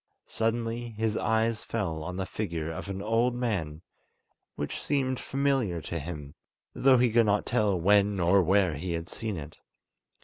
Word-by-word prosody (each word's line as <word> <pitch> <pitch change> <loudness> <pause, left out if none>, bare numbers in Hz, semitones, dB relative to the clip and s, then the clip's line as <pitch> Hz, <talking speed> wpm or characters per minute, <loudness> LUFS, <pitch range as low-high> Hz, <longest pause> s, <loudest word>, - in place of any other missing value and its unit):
Suddenly 115 +1 -2
his 110 -1 0
eyes 110 0 +1
fell 90 -9 -3
on 90 +3 -5
the 95 - -2
figure 85 -6 -3
of 80 +5 -6
an 100 0 -4
old 115 +3 +2
man, 95 -10 -2 0.7
which 75 - -4
seemed 130 -3 0
familiar 135 -10 0
to 85 +2 -4
him, 75 -2 -7 0.4
though 130 -1 +5
he 120 -1 +3
could 115 -1 +4
not 105 0 +2
tell 105 -6 +1
when 100 +2 +3
or 90 +3 +4
where 95 -1 +3
he 85 +4 -3
had 85 0 -4
seen 110 -1 -4
it. 75 0 -9
100 Hz, 165 wpm, -28 LUFS, 85-115 Hz, 0.7 s, though